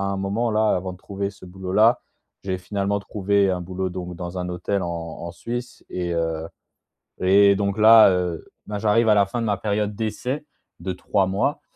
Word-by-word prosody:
un 100 0 -1
moment, 100 +5 -1
là, 110 0 +2
avant 90 0 -3
de - - -13
trouver 100 +1 -4
ce 100 -1 -13
boulot 95 0 -7
là. 110 +3 +5 0.4
J'ai 95 -1 -2
finalement 100 +2 -2
trouvé 100 0 +1
un 90 -1 -1
boulot 90 +1 -3
donc 90 -1 -6
dans 90 +1 -5
un 90 0 -3
hôtel 95 +2 -2
en 85 - -3
en 85 0 -6
Suisse 120 +7 -6
et 90 -1 -2
heu 80 -1 -2 0.7
et 100 +2 +6
donc 100 +1 -1
là, 110 -1 +8
heu, 90 -3 -2 0.2
ben 105 -1 -4
j'arrive 110 +2 +3
à 105 - +6
la 100 - +5
fin 100 +5 -4
de 115 - -1
ma 105 -2 +1
période 105 0 -1
d'essai 125 +7 -3 0.4
de 95 - -3
3 95 +2 0
mois 100 - -1
100 Hz, 200 wpm, -23 LUFS, 90-105 Hz, 0.7 s, là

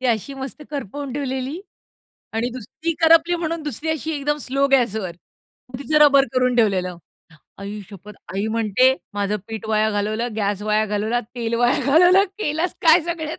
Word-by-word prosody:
ती 260 - -1
अशी 235 +4 -1
मस्त 270 +2 -7
करपवून 280 0 -5
ठेवलेली 270 +3 -3 0.7
आणि 230 +2 0
दुसरी 255 +7 -5
करपली 330 +2 +5
म्हणून 330 -1 -3
दुसरी 295 +2 -5
अशी 315 0 -3
एकदम 295 +1 -1
स्लो 275 +2 +1
गॅसवर 220 -9 +1 0.6
मग 250 - -6
तिचं 305 +2 +1
रबर 275 -1 +5
करून 255 -1 +2
ठेवलेलं. 185 -6 +1 0.6
आई 200 +1 -6
शपथ, 205 +2 -11 0.2
आई 200 +3 -1
म्हणते, 230 +4 +3 0.2
"माझं 205 0 -1
पीठ 220 -1 -6
वाया 215 0 +2
घालवलं, 215 +3 -1
गॅस 205 -1 -1
वाया 215 0 +1
घालवला, 215 +3 -1
तेल 235 -1 -2
वाया 240 +2 +2
घालवलं, 355 +7 +5
केलंस 320 -1 -1
काय 325 +1 +6
सगळ्याच." 325 -2 -4
255 Hz, 160 wpm, -21 LUFS, 215-295 Hz, 0.7 s, काय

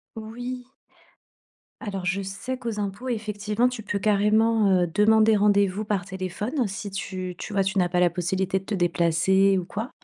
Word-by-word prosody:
Oui. 245 +3 -6 1.1
Alors 195 -3 -4
je 185 +2 0
sais 195 +7 -5
qu'aux 235 -4 -5
impôts, 200 +5 -5
effectivement, 215 0 -1
tu 250 -3 -7
peux 200 0 -2
carrément, 215 +1 +3
heu, 180 -2 +3
demander 220 +1 +4
rendez-vous 200 0 +2
par 205 -3 -1
téléphone 195 - -3
si 195 +1 -6
tu 185 -1 -5
tu 210 - -7
vois, 195 -1 +2
tu 190 +1 -2
n'as 180 - +3
pas 180 0 0
la 180 - +5
possibilité 185 +3 -1
de 190 - -18
te 210 - -2
déplacer 175 +2 +2
ou 185 - -1
quoi. 220 +7 -5
200 Hz, 175 wpm, -25 LUFS, 190-220 Hz, 1.1 s, la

